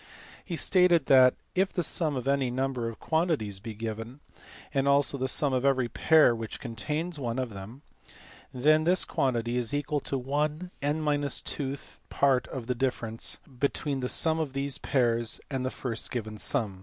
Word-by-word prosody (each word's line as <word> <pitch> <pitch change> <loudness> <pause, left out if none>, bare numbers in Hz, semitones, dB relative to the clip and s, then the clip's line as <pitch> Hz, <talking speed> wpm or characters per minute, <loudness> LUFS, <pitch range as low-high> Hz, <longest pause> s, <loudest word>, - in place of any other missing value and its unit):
He 175 - -4
stated 180 -1 +3
that, 130 -2 +6 0.2
if 190 +1 +1
the 175 - -1
sum 155 -3 0
of 125 0 -4
any 140 -2 +2
number 130 -2 -1
of 115 - -9
quantities 160 - 0
be 110 +2 -7
given, 115 +4 -6 0.5
and 135 -1 +1
also 140 0 +3
the 130 -1 -1
sum 140 +1 +1
of 130 0 +1
every 130 -3 +2
pair 155 +1 +5
which 115 -1 -6
contains 150 +8 -3
one 120 -2 -2
of 130 -3 -2
them, 105 +8 -10 0.7
then 155 +5 +3
this 180 +2 +3
quantity 120 -2 0
is 120 +2 -1
equal 145 +1 -1
to 135 - -3
one 150 +6 -2
(n 145 +2 0
2)th 145 -1 -2
part 135 -3 +2
of 130 -4 -6
the 125 - 0
difference 120 -3 -2 0.2
between 140 0 0
the 125 -1 -2
sum 160 -1 +1
of 150 -4 -2
these 140 0 -2
pairs 120 -3 +1
and 135 -2 -2
the 130 - 0
first 120 -4 -4
given 110 -3 -5
sum. 105 -9 -2
135 Hz, 175 wpm, -28 LUFS, 120-150 Hz, 0.7 s, that